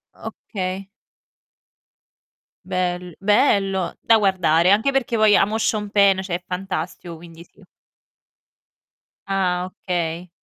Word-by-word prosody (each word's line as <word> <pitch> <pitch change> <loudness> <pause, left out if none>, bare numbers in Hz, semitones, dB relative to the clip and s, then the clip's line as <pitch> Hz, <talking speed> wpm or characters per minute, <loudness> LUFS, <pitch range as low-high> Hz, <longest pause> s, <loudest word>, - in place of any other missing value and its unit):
Okay. 190 -1 -6 1.8
Bel 180 -1 -3
bello! 195 -3 +2
Da 225 - +4
guardare, 180 -3 +2
anche 220 +7 +3
perché 265 -3 -1
poi 215 -2 +5
amo 210 +3 +1
Sean 215 -2 -1
Penn, 200 -2 +4
cioè 185 -2 -3
è 180 - -23
fantastico 180 -2 -5
quindi 165 0 -13
sì - - -23 1.6
Ah, 180 -2 0
okay. 175 -2 -4
190 Hz, 105 wpm, -21 LUFS, 180-205 Hz, 1.8 s, poi